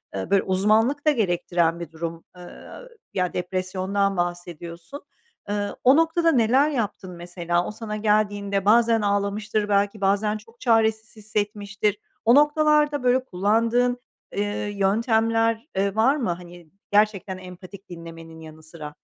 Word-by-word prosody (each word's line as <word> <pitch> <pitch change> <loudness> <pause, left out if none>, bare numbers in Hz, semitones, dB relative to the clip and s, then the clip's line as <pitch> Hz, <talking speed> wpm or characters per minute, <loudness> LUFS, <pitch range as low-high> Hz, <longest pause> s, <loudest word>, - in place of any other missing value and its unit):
Eee, 95 - -4
böyle, 195 -1 +3
uzmanlık 215 +10 +2
da - - +7
gerektiren 175 - 0
bir 170 -2 -7
durum, 165 0 -6
eee, 180 - -13
a 175 - -12
ü - - -14 0.2
ya, 180 -1 -1
depresyondan 185 +2 -1
bahsediyorsun. 175 - -5 0.5
Iıı, 205 0 -2
o 260 +3 +6
noktada 330 0 +3
neler 260 +4 +3
yaptın 210 -8 -3
mesela? 175 0 -2
O - - -4
sana 215 -1 -6
geldiğinde 205 -2 0
bazen 225 +1 +4
ağlamıştır 205 +1 -1
belki, 200 +1 +1
bazen 205 +2 +1
çok 230 +2 -19
çaresiz 220 -1 +1
hissetmiştir. 210 -1 -2 0.3
O 235 +3 +6
noktalarda, 295 -1 +3
böyle, 255 +1 +3
kullandığın, 230 +5 +1 0.4
eee, 205 +1 0 0.3
yöntemler, 225 +3 +1
eee, 195 +1 0
var 250 +6 +3
mı, 245 -10 -2
hani, 175 -1 -10 0.2
gerçekten 205 -3 +1
empatik 185 +2 -12
dinlemenin 165 -1 -10
yanı 155 0 -12
sıra? 155 -2 -10
205 Hz, 140 wpm, -24 LUFS, 180-225 Hz, 0.5 s, da